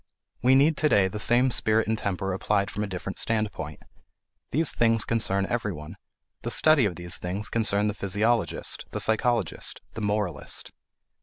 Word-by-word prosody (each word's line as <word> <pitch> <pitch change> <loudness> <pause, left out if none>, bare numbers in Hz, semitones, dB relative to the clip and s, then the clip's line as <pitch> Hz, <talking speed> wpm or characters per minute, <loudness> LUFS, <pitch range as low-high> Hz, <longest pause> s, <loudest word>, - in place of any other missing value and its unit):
We 130 +2 +5
need 145 +3 +4
to 155 - +2
day 100 -7 +4
the 105 +3 -6
same 125 +4 +2
spirit 110 -1 +2
and 110 - +1
temper 95 -3 -2
applied 100 +1 0
from 105 - -3
a - - -3
different 95 0 -6
standpoint. 105 - -2 0.7
These 160 +2 +2
things 115 -2 +2
concern 100 -4 0
everyone; 100 -11 -4 0.5
the - - -4
study 155 -6 +4
of 95 -4 -2
these 85 -1 -3
things 95 +4 -4
concerns 105 -2 +3
the - - -2
physiologist, 105 +4 -1
the - - -5
psychologist, 110 -2 0
the 115 - -6
moralist. 105 -6 -3
105 Hz, 160 wpm, -26 LUFS, 95-115 Hz, 0.7 s, We